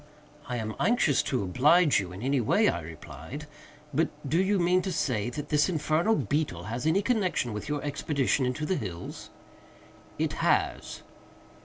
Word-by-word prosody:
"I 125 - -3
am 110 -1 -3
anxious 210 - +3
to 125 -6 -1
oblige 145 - +4
you 95 -3 -5
in 95 +5 -8
any 135 0 +1
way," 205 - +3
I 85 - 0
replied; 80 - -9 0.5
"but 160 +4 +2 0.2
do 165 +7 +2
you 200 +1 +2
mean 180 +1 +3
to 190 - -3
say 125 - -1
that 145 +4 -6
this 150 +3 +3
infernal 165 +5 +1
beetle 145 - -1
has 120 +9 -3
any 190 +6 +2
connection 190 - 0
with 105 +7 -5
your 145 -1 -2
expedition 140 -2 0
into 125 +4 -1
the 185 +3 0
hills?" 90 -5 -6 0.9
"It - - -1
has." - - 0
145 Hz, 165 wpm, -28 LUFS, 115-170 Hz, 0.9 s, oblige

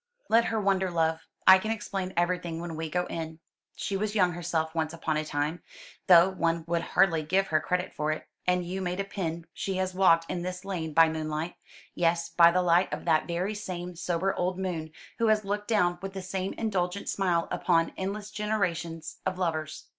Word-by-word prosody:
"Let 230 +1 +5
her 225 - 0
wonder, 195 -2 +1
love. 160 -2 0 0.2
I 190 0 +9
can 215 - -4
explain 195 -4 -3
everything 175 -1 0
when 170 -1 -5
we 160 0 -4
go 180 +2 0
in. 160 -2 -5 0.4
She 200 - -3
was 210 +2 -2
young 180 -4 +4
herself 165 -2 -2
once 160 -1 -1
upon 165 -2 -2
a 155 - 0
time, 150 +2 -2 0.5
though 175 -1 +8
one 170 -3 0
would 170 0 0
hardly 170 -2 +2
give 190 +5 +1
her 155 - +3
credit 180 +3 -2
for 150 0 -1
it; 155 - -5 0.2
and 180 -1 +2
you 185 +2 -4
may 180 -1 -1
depend 180 -4 -3
she 195 - -3
has 185 0 -1
walked 165 -3 +4
in 175 - -3
this 180 +1 -5
lane 165 -5 -3
by 165 +1 +7
moonlight. 160 +1 -3 0.4
Yes, 170 0 +1
by 170 -1 +7
the 180 +1 +2
light 175 +1 +3
of - - -5
that 160 -2 +2
very 180 +4 -1
same 180 -4 -5
sober 175 +2 -1
old 180 +1 -1
moon, 175 -4 -3 0.3
who 230 - +3
has 215 -1 +3
looked 205 +1 -2
down 175 -6 +2
with 195 0 -6
the 190 -1 -5
same 190 +1 -3
indulgent 195 -3 -2
smile 175 -4 +1
upon 165 -2 +1
endless 200 +2 -4
generations 175 -7 -2
of 190 -1 -2
lovers." 160 -4 -2
180 Hz, 200 wpm, -28 LUFS, 165-190 Hz, 0.5 s, I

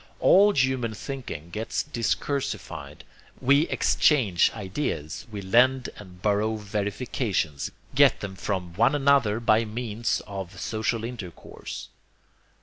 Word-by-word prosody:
All 205 +2 +6
human 130 - +1
thinking 100 - -7
gets 110 +5 -2
discursified; 140 +1 -3 0.4
we 140 +5 +4
exchange 110 - +3
ideas; 95 - -4
we 100 -2 -6
lend 125 +6 +3
and 90 -3 -13
borrow 105 +1 +1
verifications, 105 - -2 0.2
get - - +5
them 95 -2 -6
from 90 -2 -3
one 115 - +3
another 135 -7 +3
by 115 -1 +3
means 115 0 -2
of 95 -3 -7
social 110 +1 -1
intercourse. 110 -8 -8
110 Hz, 110 wpm, -26 LUFS, 100-130 Hz, 0.4 s, All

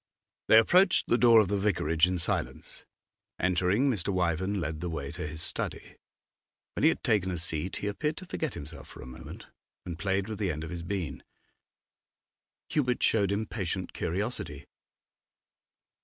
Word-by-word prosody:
They 110 - +8
approached 180 - +5
the 120 - +4
door 115 -2 +7
of 105 - +4
the 100 +1 0
vicarage 85 -5 +2
in 90 0 -1
silence. 80 - -2 0.5
Entering 90 +8 +2
Mr. 105 -8 0
Wyvern 95 +2 0
led 80 -2 -3
the 90 +1 -3
way 70 -4 -4
to 85 +1 -5
his 80 +1 -5
study. - - -4 0.8
When - - -4
he - - +7
had - - -2
taken 100 -4 +2
a 90 - -2
seat, 85 +2 +1
he 105 - -2
appeared 150 +10 -2
to 185 - -8
forget 155 -4 -3
himself 75 +1 -8
for - - -11
a - - -10
moment, 65 0 -10 0.4
and 85 -2 -6
played 95 +1 0
with 110 -1 -5
the 100 -4 +1
end 75 0 -5
of 80 - -6
his 85 -1 -5
bean. 85 -4 -4 1.5
Hubert 125 -5 0
showed 100 -3 +3
impatient 100 -3 -3
curiosity. 90 - -3
95 Hz, 165 wpm, -29 LUFS, 85-110 Hz, 1.5 s, They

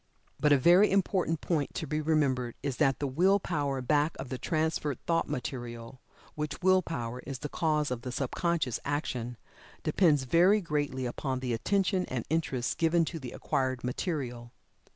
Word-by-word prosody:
But 150 - +3
a 145 - +7
very 175 +9 +6
important 185 -4 +1
point 155 -5 -1
to 165 - -2
be 150 +1 -2
remembered 135 -6 +1
is 140 -3 -2
that 135 -4 +3
the 145 - -2
Will 180 +9 +3
power 145 -7 -2
back 150 +4 +2
of 130 - -6
the 130 - -4
transferred 155 -4 -1
thought 165 0 +1
material, 120 0 -5 0.3
which 150 +2 -5
Will 185 0 +5
power 125 -8 -4
is 135 +1 -6
the 150 +4 -6
cause 150 -3 0
of 125 -2 -3
the 125 0 -5
subconscious 140 +1 -1
action, 125 -5 -3 0.5
depends 155 -7 +3
very 175 - +4
greatly 145 -7 -2
upon 130 +2 -2
the 125 -2 -2
attention 185 - +1
and 125 -3 -3
interest 135 -6 -1
given 165 0 +3
to 165 +1 -5
the 125 -4 -7
acquired 130 -2 -1
material. 125 -3 -3
145 Hz, 170 wpm, -30 LUFS, 125-165 Hz, 0.5 s, a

